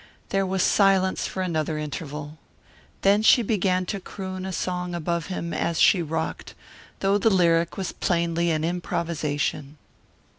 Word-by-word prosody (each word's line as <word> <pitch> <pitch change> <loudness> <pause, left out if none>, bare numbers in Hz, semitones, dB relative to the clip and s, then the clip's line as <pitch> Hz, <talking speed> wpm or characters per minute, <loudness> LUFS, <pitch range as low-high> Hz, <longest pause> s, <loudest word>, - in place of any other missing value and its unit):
There 195 -1 +1
was 190 0 0
silence 195 -2 +3
for 190 - -3
another 160 -3 -1
interval. 150 0 -6 0.6
Then 200 +2 +4
she 235 +2 +6
began 185 -4 +1
to 200 +2 -3
croon 185 0 -6
a - - -4
song 180 -1 -3
above 170 0 -2
him 170 -3 -4
as 170 -2 -1
she 185 - +5
rocked, 160 0 -4 0.5
though 195 +1 +2
the 225 - +4
lyric 170 -4 +2
was 190 -2 -3
plainly 170 -1 0
an 155 -1 0
improvisation. 155 -4 -2
175 Hz, 145 wpm, -25 LUFS, 160-190 Hz, 0.6 s, she